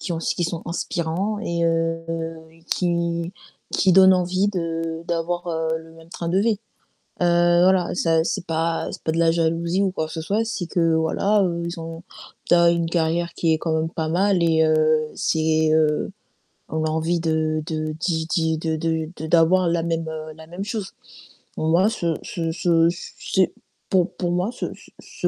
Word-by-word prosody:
qui 185 - -4
ont 165 - -2
s - - -1
qui 175 - -1
sont 170 0 -2
inspirants 175 +4 -2
et 170 -5 -1
heu, 165 0 0 0.7
qui 170 -1 -1 0.4
qui 190 - +3
donnent 190 0 +8
envie 185 +2 +1
de 165 -3 -3
d'avoir, 175 +1 -2
heu, 160 -1 -1
le 160 0 -14
même 165 0 -16
train 170 -1 -5
de 185 - +2
vie. 215 0 +1 0.6
Heu, 175 0 +4
voilà, 185 -1 +3
ça 165 -2 +2
c'est 170 - -2
pas 165 +1 -1
c'est - - -8
pas 160 - 0
de 165 - -2
la 165 -1 +4
jalousie 170 +2 0
ou 195 -2 +1
quoi 160 -3 -2
que - - -9
ce 160 - -4
soit, 210 +7 0
c'est 205 -5 -3
que, 165 -2 +1
voilà, 195 +6 +2
heu, 170 -2 -1
ils 170 0 -5
ont 165 +1 -7 0.4
tu - - +4
as 170 0 +5
une 170 -1 0
carrière 170 0 0
qui 165 -2 +1
est 160 - +2
quand 160 0 -2
même 160 0 0
pas 160 -2 -3
mal 185 +1 +2
et 160 -1 +4
heu, 155 0 +3 0.4
c'est 160 -1 +1
heu, 155 +1 +2 0.6
on 160 0 -1
a - - 0
envie 160 +2 0
de 160 -1 0
de 155 -1 -2
d'y 165 -3 -1
d'y 160 -1 +1
de 160 0 -2
de 160 0 -1
de 160 - -5
d'avoir 175 +3 +4
la 170 -1 0
même, 165 -1 -2
heu, 155 0 -6
la 160 0 -13
même 175 +4 -6
chose. 210 -3 -4 0.6
Moi 170 +6 +3
ce 170 -7 -1
ce 165 -2 -3
ce 165 -1 +3
c 170 - -7
c'est, 190 -2 +1 0.4
pour 185 -1 +2
pour 175 -2 -2
moi 180 +6 0
se 250 - -5
se - - -17
se - - -3
165 Hz, 200 wpm, -23 LUFS, 160-175 Hz, 0.7 s, donnent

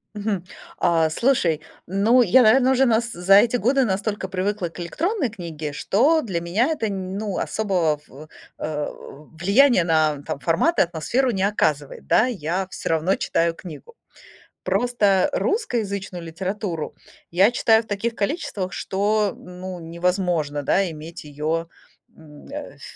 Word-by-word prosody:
Мгм. 205 -3 -2 0.3
А 165 -2 +2
слушай, 170 - +1 0.2
ну 210 +7 +3
я, 235 +5 +5
наверное, 250 +3 +5
уже 265 0 +4 0.3
за 180 +3 +4
эти 235 +4 +5
годы 260 +5 +2
настолько 205 -1 -2
привыкла 190 0 -2
к 165 - -13
электронной 295 - -1
книге, 165 -7 -6
что 280 - +2
для 185 - -3
меня 195 - +1
это 230 -9 -1
нь 190 -1 -4
ну, 210 -3 -3
особого 180 -8 0
в 150 +4 -13 0.3
э, 150 -1 -3 0.4
влияния 200 - +4
на 155 -3 +1
фо - - -4
формат 165 - +1
и - - +7
атмосферу 185 - 0
не 195 -4 -1
оказывает. 150 - -1
Да, 220 - +4
я 190 -5 -2
всё - - -5
равно 165 +4 +2
читаю 165 0 0
книгу. 180 - -11 0.7
Просто 210 -6 +2
русскоязычную 210 - -2
литературу 180 0 -4 0.4
я 190 +6 +4
читаю 225 -2 +4
в - - -24
таких 225 +3 -2
количествах, 200 - -2
что, 205 +1 0
ну, 180 0 -8
невозможно, 170 -3 -1
да, 190 +6 +1
иметь 160 +1 -9
ее 155 +3 -3 0.5
м, 150 -2 -15
э, 290 0 -7
ф - - -19
190 Hz, 145 wpm, -23 LUFS, 165-220 Hz, 0.7 s, и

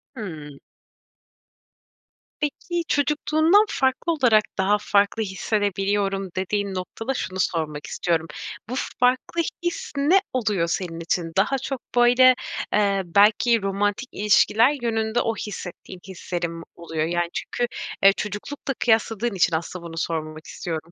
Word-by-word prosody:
Hımm. 155 - -8 1.8
Peki, 340 +4 -2
çocukluğundan 310 - +3
farklı 265 +5 0
olarak 245 -9 +4
daha 195 +2 +3
farklı 205 +2 +2
hissedebiliyorum 195 -1 -1
dediğin 200 +1 -1
noktada 225 +7 -4
şunu 190 -7 -4
sormak 155 -5 -1
istiyorum, 165 +1 -1 0.4
bu - - -4 0.3
farklı 255 +7 +2 0.2
his 345 0 -3
ne 305 +8 +5
oluyor 210 -9 0
senin 170 -1 -3
için? 165 0 -2
Daha 215 +8 +3
çok, 270 0 -4
böyle, 245 +1 +6 0.4
eee, 200 -2 +2
belki 210 +5 +4
romantik 205 +5 -1
ilişkiler 230 +6 +3
yönünde 225 0 0
o 225 - -1
hissettiğin 185 -3 -7
hislerin 175 -2 -4
mi 165 0 -8
oluyor? 165 -2 -3
Yani, 175 +1 -1
çünkü, 240 - -2 0.4
eee, 195 0 +8
çocuklukla 210 +7 -4
kıyasladığın 225 -2 +1
için 175 -2 +3
aslında 170 +2 -5
bunu 165 -1 -8
sormamak 155 -1 -3
istiyorum. 165 -2 -5
205 Hz, 125 wpm, -23 LUFS, 175-245 Hz, 1.8 s, eee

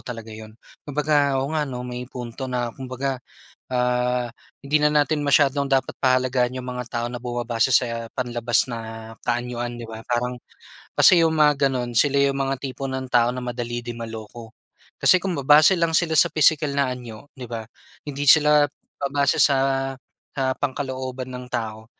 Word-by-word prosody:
talaga 115 -3 -7
yun. 110 0 -11 0.3
Kumbaga, 145 -1 +1
oo 135 +3 -2
nga 150 -2 -1
'no, 125 -1 -5
may 125 0 -6
punto 125 +1 -7
na 120 -2 -2
kumbaga, 130 +1 -4 0.5
ah, 125 0 0 0.3
hindi 145 +2 +2
na 150 0 +2
natin 150 0 +1
masyadong 140 0 +3
dapat 135 -1 0
pahalagahan 130 -1 +1
yung 125 - -7
mga 125 -1 -5
tao 120 0 -2
na 120 - -5
bumabase 120 0 -1
sa 115 -2 +1
panlabas 120 -1 0
na 115 -1 -7
kaanyuan, 120 0 -2
'di 115 - -7
ba? 110 0 -9
Parang 125 +1 -1 0.6
kasi, 175 -2 +7
yung 160 -1 +2
mga 145 -2 +4
ganun 120 -2 -3
sila 140 +4 +3
yung 140 0 +2
mga 135 0 -2
tipo 135 0 -5
ng 130 0 -4
tao 120 0 +4
na 125 - -5
madali 120 -1 -4
ding 120 0 -6
maloko. 115 0 -8 0.5
Kasi, 185 - +5
kung 190 -2 -2
babase 150 +6 +6
lang 165 -1 +1
sila 160 -1 +2
sa - - +6
pisikal 150 -2 +3
na 140 -2 +1
anyo, 125 +1 -9
'di 125 - -7
ba, 115 -1 -4 0.4
hindi 145 0 -4
sila 150 0 +6 0.3
babase 140 0 +1
sa, 135 -1 +2 0.4
ah, 130 -1 +1
pangkalooban 130 -2 -4
ng 125 0 -7
tao, 110 -2 -4
130 Hz, 170 wpm, -23 LUFS, 120-140 Hz, 0.6 s, kasi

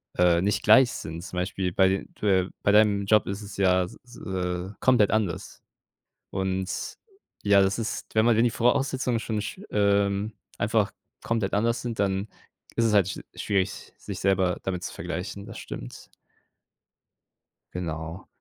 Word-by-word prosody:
äh, 90 -1 +4
nicht 100 +2 +1
gleich 120 +4 +7
sind, 80 +2 -6
zum 90 - -7
Beispiel 90 0 -1
bei 95 0 +3 0.2
äh, 95 -3 +2
bei 100 - +3
deinem 105 -1 +4
Job 105 +1 +4
ist 100 +2 -4
es 100 -1 -9
ja 95 -1 +3
s - - -12 0.2
äh, 90 -1 -3
komplett 125 -6 +4
anders. 105 -6 -2 0.7
Und 95 0 -2 0.5
ja, 100 -1 +6
das 95 +3 +1
ist, 115 - -4
wenn 110 0 +4
man 120 -2 +4
wenn 115 - +4
die 120 - +3
Voraussetzungen 125 0 +1
schon 110 -1 -2
sch 105 - -6
ähm, 100 0 +2 0.3
einfach - - +1 0.3
komplett 110 -4 -1
anders 115 +3 +1
sind, 115 -3 -3
dann 95 0 0 0.5
ist 115 - +2
es 110 - +2
halt 100 -3 +5
sch 95 - -5 0.2
schwierig, 100 -1 -2
sich - - -7
selber 95 -2 +2
damit 90 -2 -2
zu - - -5
vergleichen, 100 +3 -5
das - - -9
stimmt. - - -8 1.6
Genau. 80 0 -5
100 Hz, 155 wpm, -26 LUFS, 95-110 Hz, 1.6 s, gleich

